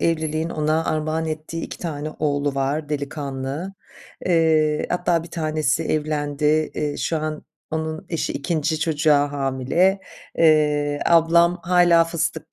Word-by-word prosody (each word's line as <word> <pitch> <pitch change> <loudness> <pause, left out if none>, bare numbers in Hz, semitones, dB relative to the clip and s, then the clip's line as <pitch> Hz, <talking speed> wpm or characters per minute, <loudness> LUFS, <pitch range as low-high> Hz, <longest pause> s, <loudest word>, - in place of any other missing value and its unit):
evliliğin 160 0 0
ona 155 +1 0
armağan 155 +1 -1
ettiği 155 +1 -5
2 - - -7
tane 155 -3 -4
oğlu 145 -2 0
var. 140 +3 -1
Delikanlı. 145 +3 -4 0.5
Eee, 160 -3 +2
hatta 175 -2 +1
bir 170 - -12
tanesi 155 -2 0
evlendi. 150 -2 -2 0.3
Eee, 150 -1 -2
şu 165 - -1
an 155 0 -4 0.3
onun 160 +2 -4
eşi 165 - -2
2'nci 155 +1 -1
çocuğa 150 -2 +2
hamile. 140 +8 +1 0.4
Eee, 150 -2 +3
ablam 170 +1 +4
hâlâ 175 -2 +5
fıstık 165 -1 -3
155 Hz, 125 wpm, -22 LUFS, 145-165 Hz, 0.5 s, hâlâ